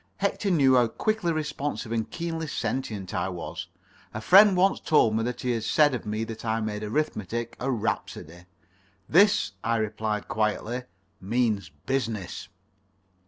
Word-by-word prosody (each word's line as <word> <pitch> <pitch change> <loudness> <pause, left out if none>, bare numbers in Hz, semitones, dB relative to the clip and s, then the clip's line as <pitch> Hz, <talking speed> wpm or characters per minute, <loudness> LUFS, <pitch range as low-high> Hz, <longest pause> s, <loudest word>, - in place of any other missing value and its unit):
Hector 200 +1 -1
knew 140 -7 +4
how 120 -2 +5
quickly 215 - -1
responsive 150 -6 -3
and 115 -2 -1
keenly 165 -1 -4
sentient 110 -9 -3
I 95 - -1
was. 90 -2 -6 0.5
A - - -2
friend 190 - +7
once 190 +2 +3
told 115 -8 +3
me 110 - +1
that 120 +2 -3
he 125 - 0
had 115 -2 -1
said 145 +3 +3
of 120 -3 -4
me 110 +1 -2
that 110 0 -7
I 110 -1 0
made 105 -1 -3
arithmetic 115 - -2
a 130 - -2
rhapsody. 90 - -3 0.6
"This," 185 - +4
I 115 +1 +1
replied 110 -1 -2
quietly, 115 +2 -1 0.4
"means 105 -2 0 0.2
business." 115 -9 -3
115 Hz, 150 wpm, -26 LUFS, 110-150 Hz, 0.6 s, friend